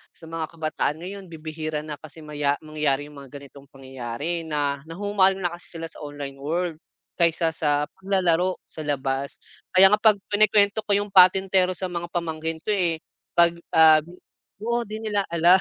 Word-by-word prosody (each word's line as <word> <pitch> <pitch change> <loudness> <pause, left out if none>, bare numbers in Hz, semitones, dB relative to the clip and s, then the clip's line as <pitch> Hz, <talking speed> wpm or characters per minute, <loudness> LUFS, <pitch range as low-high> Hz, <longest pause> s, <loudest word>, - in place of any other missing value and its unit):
sa - - -19
mga 165 -1 -3
kabataan 155 -1 -1
ngayon 195 +1 -8
bibihira 155 -1 -5
na 150 -2 -7
kasi 155 +1 -12
maya 145 -1 0
mangyari 150 -2 0
yung 140 - -12
mga 135 - -13
ganitong 140 0 -15
pangyayari 135 +5 -5
na 145 -2 -1
nahuhumaling 195 +1 +2
na 175 - 0
kasi 175 0 -12
sila 165 - -5
sa - - -14
online 145 -2 -7
world 165 +3 -2 0.4
kaysa 165 -1 +2
sa 145 -2 +1 0.2
paglalaro 185 -2 +1
sa - - -13
labas. 135 -1 -2 0.4
Kaya 190 +1 +9
nga 210 - +4
'pag 220 -2 +5 0.2
kinukwento 205 0 +4
ko 205 - -1
yung 205 0 -3
patentero 185 0 +6
sa 185 - -3
mga 170 0 -4
pamangkin 160 -2 -3
ko - - -1
eh, 175 -5 +1 0.4
'pag, 170 0 +6 0.2
ah 160 -1 +8 0.6
oo 235 +1 0
di 215 +1 -5
nila 210 -2 0
alam, 170 +3 +5
165 Hz, 170 wpm, -24 LUFS, 150-185 Hz, 0.6 s, Kaya